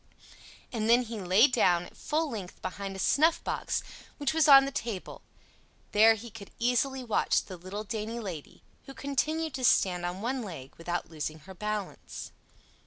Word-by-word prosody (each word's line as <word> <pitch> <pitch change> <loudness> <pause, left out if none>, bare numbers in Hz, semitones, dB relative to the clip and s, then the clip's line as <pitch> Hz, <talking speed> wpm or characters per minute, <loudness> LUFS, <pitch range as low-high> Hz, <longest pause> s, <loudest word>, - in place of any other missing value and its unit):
And 220 -1 -1
then 240 +2 +6
he 230 -2 -6
lay 190 +6 +5
down 180 -9 +2
at - - -15
full 315 +2 -1
length 205 -9 -7
behind 195 +1 -5
a - - -6
snuffbox 310 - +1 0.3
which 290 0 0
was 320 -1 +4
on 275 -2 +9
the 275 - -3
table; 230 -9 -5 0.7
there 225 +2 +6
he 225 +2 -9
could 205 -2 -10
easily 250 +2 +1
watch 230 -3 +1
the 185 - -9
little 185 +4 -6
dainty 220 +2 -4
lady, 180 -9 -7 0.2
who 270 - -9
continued 310 +3 -1
to 260 - -4
stand 180 -7 +3
on 175 +1 -3
one 250 +5 -2
leg 165 - -8
without 175 0 -4
losing 155 0 -4
her 190 +5 -11
balance. 210 0 -5
220 Hz, 170 wpm, -29 LUFS, 185-260 Hz, 0.7 s, on